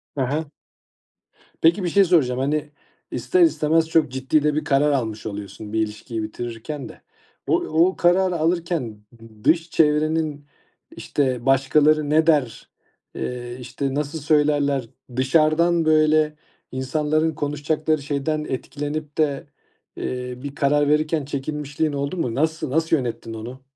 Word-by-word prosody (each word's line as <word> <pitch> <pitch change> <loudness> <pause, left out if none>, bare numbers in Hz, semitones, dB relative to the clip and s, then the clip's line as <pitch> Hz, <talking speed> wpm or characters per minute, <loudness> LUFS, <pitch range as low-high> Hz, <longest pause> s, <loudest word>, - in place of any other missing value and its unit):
He 135 - -1
he. 145 +3 -2 1.1
Peki, 170 +4 +4
bir 175 - 0
şey 200 +3 +5
soracağım, 140 -9 +2
hani, 145 +2 -1 0.4
ister 365 -1 +1
istemez 160 - +3
çok 160 -6 +2
ciddi 135 +3 +1
de 150 -1 +1
bir 155 - 0
karar 145 +1 +2
almış 110 -6 -2
oluyorsun. 105 0 -7
Bir 110 - +1
ilişkiyi 110 +1 -3
bitirirken 120 +6 -6
de - - -14 0.5
o - - +1
o 175 - +2
kararı 180 +1 +3
alırken 160 -10 -1
d 115 -2 -17
dış 165 0 +2
çevrenin, 155 -1 +1 0.5
işte, 130 -4 -1
başkaları 145 +3 +3
ne 160 +2 +3
der, 145 -7 +1 0.5
eee, 120 0 -5
işte, 130 +2 -4
nasıl 150 +2 -2
söylerler? 145 -4 +2 0.3
Dışarıdan, 155 +5 +3
böyle, 155 -1 +3 0.4
insanların 150 +4 0
konuşacakları 150 +1 -1
şeyden 150 +2 -2
etkilenip 145 +3 -4
de, 145 -3 0 0.5
eee, 125 0 -4
bir 140 0 -6
karar 145 0 +2
verirken 155 0 +1
çekinmişliğin 145 +2 -3
oldu 140 +6 -3
mu? 125 -8 -2
Nası 155 0 0
nasıl 160 +3 +2
yönettin 115 -4 -4
onu? 120 +4 -8
150 Hz, 135 wpm, -22 LUFS, 130-155 Hz, 1.1 s, şey